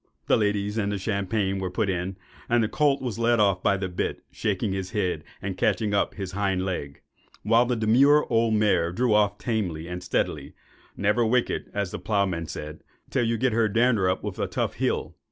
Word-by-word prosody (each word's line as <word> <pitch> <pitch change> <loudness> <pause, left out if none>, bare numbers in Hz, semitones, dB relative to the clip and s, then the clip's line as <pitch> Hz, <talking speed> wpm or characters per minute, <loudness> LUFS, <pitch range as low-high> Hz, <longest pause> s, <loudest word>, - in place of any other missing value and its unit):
The - - +4
ladies 105 0 0
and 100 -1 0
the 100 - -1
champagne 100 0 -1
were 95 -1 -2
put 100 +4 -1
in, 95 0 -2 0.3
and 120 -1 +3
the - - +1
colt 140 +3 +1
was 120 -3 -3
led 115 0 +3
off 100 -3 +3
by 100 +2 +2
the 95 0 -2
bit, 90 -1 -3
shaking 105 -1 -1
his 95 -1 -3
head, 95 -4 -1 0.2
and 95 -1 -3
catching 105 +2 +1
up 100 - +1
his 95 -3 -5
hind 95 -1 0
leg; 70 -7 -4 0.4
while 115 +3 +4
the 125 - +1
demure 130 +7 +4
old 115 -1 +2
mare 100 -6 +2
drew 120 +4 +1
off 105 -1 +3
tamely 90 -10 -2
and 90 0 -5
steadily, - - -2 0.4
"never 105 +4 +2
wicked," 120 +2 0
as 100 -3 -2
the - - -5
ploughman 95 -6 -1
said, 75 +1 -7 0.3
"till 130 - +1
you 115 0 0
got 130 +2 +1
her 110 0 +2
dander 115 -3 +3
up 95 - -1
with - - -5
a - - 0
tough - - -2
hill." - - -2
105 Hz, 205 wpm, -25 LUFS, 95-115 Hz, 0.4 s, The